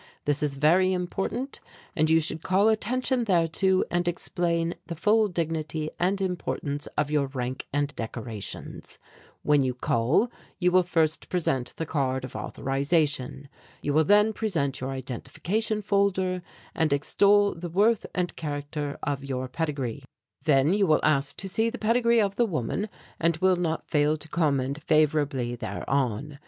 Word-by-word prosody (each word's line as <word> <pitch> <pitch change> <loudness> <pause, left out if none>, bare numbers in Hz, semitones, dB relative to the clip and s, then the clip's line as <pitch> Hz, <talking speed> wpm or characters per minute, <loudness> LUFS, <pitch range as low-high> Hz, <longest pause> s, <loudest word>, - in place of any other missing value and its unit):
This 145 -1 +1
is 145 -2 -1
very 175 +6 +4
important 195 +9 -3 0.4
and 155 0 +2
you 160 0 +5
should 160 0 -3
call 195 +5 +3
attention 245 +3 0
thereto 185 0 +2
and 175 0 0
explain 170 -1 0
the 170 - -4
full 215 +6 +3
dignity 160 -3 -2
and 190 +3 +1
importance 170 -6 -3
of 150 -1 0
your 145 -2 +2
rank 130 -1 -4
and 145 0 -1
decorations. 115 -2 -6 0.5
"When 145 -1 +4
you 130 -2 0
call 125 - +1 0.3
you 180 -1 +2
will 185 +1 +6
first 165 -3 0
present 135 -8 -1
the 165 - -2
card 130 -4 -1
of 130 - -11
authorization. 140 -1 -1 0.4
You 145 - 0
will 155 +2 +5
then 210 +6 +4
present 160 - -1
your 130 - -3
identification 150 - -3
folder 190 -2 +1 0.3
and 160 -2 +1
extol 200 +8 +3
the 175 +1 -6
worth 205 +5 +2
and 180 -1 -1
character 145 -1 -4
of 140 -2 -2
your 130 -2 -3
pedigree. 140 -3 -3 0.4
"Then 145 +2 +4
you 200 -1 +2
will 155 - +4
ask 140 -2 +1
to 195 - -5
see 220 +4 +1
the 250 - -6
pedigree 235 +1 +3
of 200 -1 -1
the 240 - +3
woman, 185 - -2 0.3
and 165 0 +2
will 185 +2 +3
not 165 -2 -3
fail 150 0 +3
to 155 - -10
comment 145 -3 0
favourably 145 -6 +2
thereon. 135 +2 -2
160 Hz, 155 wpm, -26 LUFS, 140-185 Hz, 0.5 s, will